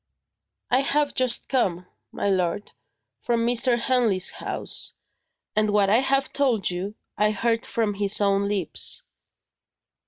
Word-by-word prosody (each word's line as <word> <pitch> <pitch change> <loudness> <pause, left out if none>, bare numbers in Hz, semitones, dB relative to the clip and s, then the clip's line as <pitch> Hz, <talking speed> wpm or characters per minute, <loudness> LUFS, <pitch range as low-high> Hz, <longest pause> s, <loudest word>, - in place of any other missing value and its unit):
"I 250 - +4
have 285 +1 +1
just 255 -2 +1
come, 185 -9 0 0.3
my - - -3
lord, 185 0 -1 0.5
from 235 -1 0
Mr. 240 +1 +3
Henley's 235 -7 +2
house; - - -2 0.6
and 215 0 +2
what 205 -1 +3
I 225 - +5
have 270 +1 0
told 245 -10 +1
you, 190 +4 -5 0.2
I 210 0 +4
heard 230 +3 -1
from 225 -5 -1
his 200 0 +1
own 200 -1 +2
lips." 200 -5 -3
215 Hz, 130 wpm, -24 LUFS, 200-250 Hz, 0.6 s, I